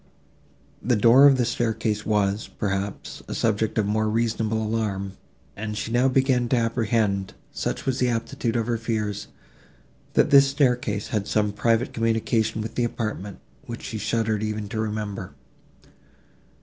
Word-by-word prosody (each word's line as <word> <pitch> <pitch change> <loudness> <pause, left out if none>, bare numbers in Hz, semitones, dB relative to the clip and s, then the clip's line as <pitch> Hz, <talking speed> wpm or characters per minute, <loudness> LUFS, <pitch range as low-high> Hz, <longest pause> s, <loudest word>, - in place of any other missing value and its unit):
The 120 +3 +2
door 120 +6 +7
of 135 -2 +5
the 125 - +2
staircase 110 -2 -1
was, 105 -1 +1
perhaps, 100 -1 -4
a - - -4
subject 110 0 0
of 110 - +2
more 110 +1 +1
reasonable 110 0 0
alarm, 105 -3 -2 0.4
and 105 +1 -5
she 115 - -4
now 125 +2 +3
began 130 -2 +2
to 130 - +3
apprehend, 115 -4 0 0.2
such - - -3
was 130 -1 0
the 125 - +2
aptitude 115 0 -2
of 115 -2 +1
her 115 -1 -1
fears, 105 -3 -2 0.9
that - - +3
this 140 -1 +8
staircase 125 -7 0
had 105 -2 -1
some 105 -1 +1
private 115 +3 +1
communication 115 -1 0
with 110 +1 -6
the 120 - 0
apartment, 110 -4 -4 0.3
which 115 -1 -7
she 110 - -5
shuddered 110 0 0
even 110 -1 -3
to 110 - -4
remember. 105 -3 -4
110 Hz, 150 wpm, -24 LUFS, 105-120 Hz, 0.9 s, this